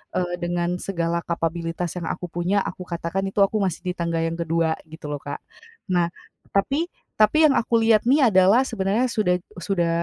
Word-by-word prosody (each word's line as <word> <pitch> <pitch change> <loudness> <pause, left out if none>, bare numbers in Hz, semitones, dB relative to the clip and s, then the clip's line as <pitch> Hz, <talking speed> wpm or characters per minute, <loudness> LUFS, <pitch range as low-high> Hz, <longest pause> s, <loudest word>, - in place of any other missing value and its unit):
eee, 180 -1 -1
dengan 175 0 0 0.2
segala 170 -3 0
kapabilitas 165 +1 -2
yang 165 - -5
aku 180 - -6
punya, 180 +4 +1
aku 180 - -10
katakan 170 +3 -2
itu 195 - -3
aku 215 +2 +1
masih 175 -2 -3
di - - +1
tangga 170 -1 0
yang 165 +1 -2
kedua 165 0 +1 0.2
gitu 160 0 -11
loh 145 - -3
Kak. 145 0 -6 0.5
Nah, 175 -1 +3 0.5
tapi 280 - +1 0.3
tapi 215 +8 +5
yang 295 - +6
aku 235 - -5
lihat 225 -1 +5
nih 265 -4 +5
adalah 190 +6 +5
sebenarnya 220 0 0
sudah 180 -5 +2 0.2
sudah 175 -1 0
180 Hz, 180 wpm, -23 LUFS, 170-205 Hz, 0.5 s, yang